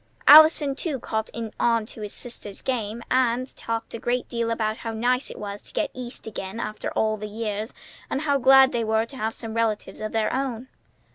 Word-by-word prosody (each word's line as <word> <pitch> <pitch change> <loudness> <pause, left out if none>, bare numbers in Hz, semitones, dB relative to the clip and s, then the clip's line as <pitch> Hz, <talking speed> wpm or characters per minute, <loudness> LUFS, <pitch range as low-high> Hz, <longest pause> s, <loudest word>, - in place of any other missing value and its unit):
Allison 305 -2 +8
too 285 0 -3
caught 220 -1 -3 0.3
on 230 -2 +2
to 220 - -11
his 210 -1 -5
sister's 230 -5 -6
game, 235 -3 -2
and 255 0 +1
talked 230 0 -4
a 230 - -5
good 245 +1 -1
deal 235 -1 -1
about 220 -1 -1
how 225 - -5
nice 250 +4 0
it - - -9
was 205 0 -6
to - - -13
get - - -1
East 250 -1 -8
again 200 -1 -6
after 215 -2 -4
all 215 0 +1
the 210 0 -6
years, 215 +1 -4 0.4
and 270 - -1
how 285 -3 +1
glad 265 +1 +7
they 235 -2 -1
were 220 0 +1
to 250 - -13
have 220 -1 -2
some 225 -2 -6
relatives 225 -2 -1
of 215 - -3
their 220 -1 0
own. 260 -2 -3
230 Hz, 205 wpm, -25 LUFS, 220-255 Hz, 0.4 s, Allison